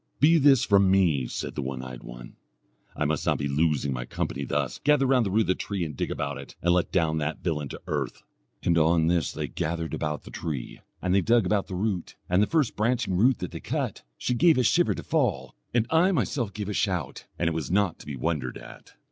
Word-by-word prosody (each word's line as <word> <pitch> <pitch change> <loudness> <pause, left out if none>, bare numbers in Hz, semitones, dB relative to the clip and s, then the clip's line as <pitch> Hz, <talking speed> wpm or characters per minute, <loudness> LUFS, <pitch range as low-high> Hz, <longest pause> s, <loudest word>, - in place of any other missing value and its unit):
'Be 160 +3 +6
this 135 -3 +5
from 100 -2 +4
me!' 85 -10 +3
said - - -5
the - - -3
one 65 -1 -4
eyed 65 -1 -8
one - - -10 0.6
'I 75 - -1
must 75 -1 0
not - - +3
be 70 - -2
losing 70 -1 +1
my 60 -1 -3
company 70 +2 -3
thus; - - -2
gather 145 -1 +4
round 130 -4 +3
the - - -1
root 105 +4 +3
of - - -1
the - - +5
tree 95 -2 -3
and 75 -3 -6
dig - - -2
about 70 -1 -3
it, 70 - -11
and 85 +1 +2
let 90 -1 +1
down 80 -3 +1
that 75 +1 -3
villain 75 -5 -2
to - - -7
earth.' - - -3 0.4
On 85 -1 +3
this 85 -1 +1
they - - -4
gathered 85 0 -3
about 75 -1 -3
the - - -11
tree, 75 -7 -5 0.2
and 90 0 +1
they 100 - +4
dug 115 +4 +3
about 105 -2 +1
the 95 - -5
root, 95 -2 -2
and 90 +2 +3
the 105 - +3
first 155 -6 +1
branching 115 -2 0
root 120 +7 +4
that 90 - -5
they - - -6
cut, - - -3 0.2
she 125 - -1
gave 160 +5 +4
a 125 - +3
shiver 175 +9 +3
to - - -7
fall, 105 - 0 0.2
and 115 -2 +2
I 170 +4 +4
myself 130 - -1
gave 105 0 -5
a - - -2
shout 90 -9 -2
and 85 - 0
it 85 - +1
was 80 -2 -3
not 95 -2 +1
to - - -13
be 75 - -4
wondered 65 -2 -2
at. - - -13
90 Hz, 240 wpm, -26 LUFS, 75-110 Hz, 0.6 s, Be